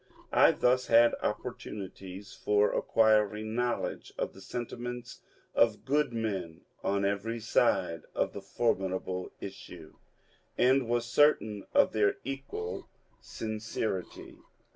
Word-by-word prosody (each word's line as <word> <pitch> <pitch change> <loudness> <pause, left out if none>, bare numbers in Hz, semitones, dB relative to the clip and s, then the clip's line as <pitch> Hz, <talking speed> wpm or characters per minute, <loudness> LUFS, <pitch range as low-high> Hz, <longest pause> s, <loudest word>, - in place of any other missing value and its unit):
I - - +7
thus 125 +1 +2
had 115 +1 +6
opportunities 100 -3 -5
for 105 0 +2
acquiring 110 -1 +2
knowledge 120 0 -2
of - - -2
the 95 - -13
sentiments 120 +3 -6 0.3
of 115 -2 +3
good 145 0 +2
men 100 -8 -3 0.2
on 100 0 +1
every 100 +4 -1
side 85 -6 +2
of - - 0
the 100 - -6
formidable 95 -3 -1
issue, - - -10 0.6
and 130 -1 +3
was 120 0 +1
certain 110 -10 +2
of - - +5
their 105 -2 +3
equal 120 -9 -5 0.3
sincerity. 110 -3 -4
110 Hz, 110 wpm, -30 LUFS, 100-120 Hz, 0.6 s, I